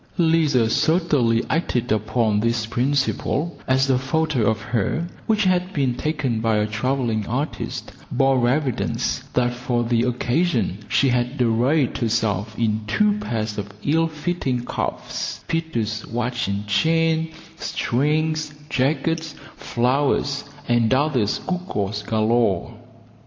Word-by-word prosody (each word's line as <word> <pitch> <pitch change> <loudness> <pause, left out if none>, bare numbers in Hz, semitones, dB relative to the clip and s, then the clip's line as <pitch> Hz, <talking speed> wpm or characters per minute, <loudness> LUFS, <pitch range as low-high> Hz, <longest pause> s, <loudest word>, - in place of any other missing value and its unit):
Lizer 160 - +3
certainly 140 -4 +2
acted 125 -8 0
upon 110 0 +1
this 115 0 0
principle, 140 +6 0
as 130 0 +3
a 130 -2 +3
photo 130 -3 +1
of 110 0 0
her, 120 - -1 0.2
which 215 -1 +3
had 185 0 +1
been 135 -4 +1
taken 135 -4 -1
by 110 -1 +2
a 105 - +2
travelling 110 -1 -1
artist, 135 +7 -3 0.2
bore 130 -3 +3
evidence 135 -2 0 0.2
that 125 -1 +2
for 120 -1 -1
the 115 0 +1
occasion 125 - 0
she 135 - +3
had 125 +2 0
arrayed 125 +4 +2
herself 110 -2 0
in 110 -2 +1
two 210 - +2
pairs 110 - -3
of 105 0 -5
ill 165 +3 +2
fitting 150 -6 -2
cuffs, - - -4
Peter's 115 -11 -2
watch 120 0 -2
and 100 +1 -2
chain, 160 +9 +2 0.3
strings, 150 +3 0 0.2
jackets, 160 +4 0 0.2
flowers, 140 +3 0 0.2
and 120 -2 +2
other 135 -6 +2
gewgaws 105 - -2
galore. 110 -2 +1
125 Hz, 120 wpm, -22 LUFS, 115-155 Hz, 0.3 s, Lizer